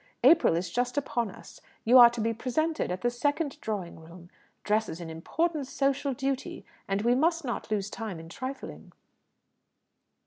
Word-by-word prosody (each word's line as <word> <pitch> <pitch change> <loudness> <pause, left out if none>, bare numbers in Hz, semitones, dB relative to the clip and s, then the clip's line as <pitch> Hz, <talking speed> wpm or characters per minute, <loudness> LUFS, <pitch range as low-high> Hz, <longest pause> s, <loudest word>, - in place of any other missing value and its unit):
April 280 - +6
is 175 +2 -2
just 245 +3 -1
upon 240 -5 -1
us. - - -13 0.2
You 250 +3 +7
are 240 -1 +10
to 235 -1 -5
be 230 +1 0
presented 310 - -1
at 180 - -4
the 240 - +1
second 290 +3 -1
Drawing 195 -7 -4
room. 170 +2 -14 0.3
Dress 215 +1 +1
is 160 - -6
an 165 -2 -7
important 300 - -2
social 275 0 0
duty, 270 +1 -3 0.2
and 195 +1 -1
we 240 +1 +4
must 330 +4 +1
not 240 - -4
lose 210 -2 -1
time 215 -7 -5
in 165 - -10
trifling." 260 +10 -7
240 Hz, 170 wpm, -28 LUFS, 195-275 Hz, 0.3 s, are